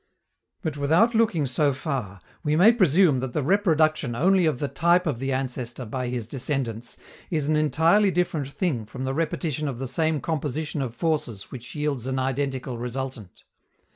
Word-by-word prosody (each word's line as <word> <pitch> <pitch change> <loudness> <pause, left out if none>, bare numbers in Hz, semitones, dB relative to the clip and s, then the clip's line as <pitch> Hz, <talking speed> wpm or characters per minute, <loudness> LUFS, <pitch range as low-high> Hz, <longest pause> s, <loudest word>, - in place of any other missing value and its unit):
But, 155 -4 -3
without 165 +12 +3
looking 220 -10 +2
so 140 +2 +1
far, 125 - -4 0.2
we 150 0 +1
may 190 +8 +7
presume 180 - +4
that 125 -1 -4
the 150 - 0
reproduction 155 - +2
only 185 +5 +3
of 155 - +1
the 145 - -2
type 175 +4 +2
of 145 -8 -1
the 135 +1 -2
ancestor 125 -2 -3
by 125 +3 -3
his 120 -2 -3
descendants 125 -3 -3 0.3
is 155 -5 -1
an 155 - +2
entirely 165 +7 +3
different 175 -6 -1
thing 140 - -2
from 130 +4 -7
the 130 0 -1
repetition 155 -1 -1
of 135 -4 -4
the 135 +1 -4
same 155 +4 0
composition 150 0 -3
of 125 -3 -4
forces 150 - -2
which 120 -2 -9
yields 145 -5 -2
an 130 0 -1
identical 130 -1 -2
resultant. 125 -4 -6
140 Hz, 170 wpm, -25 LUFS, 130-160 Hz, 0.3 s, may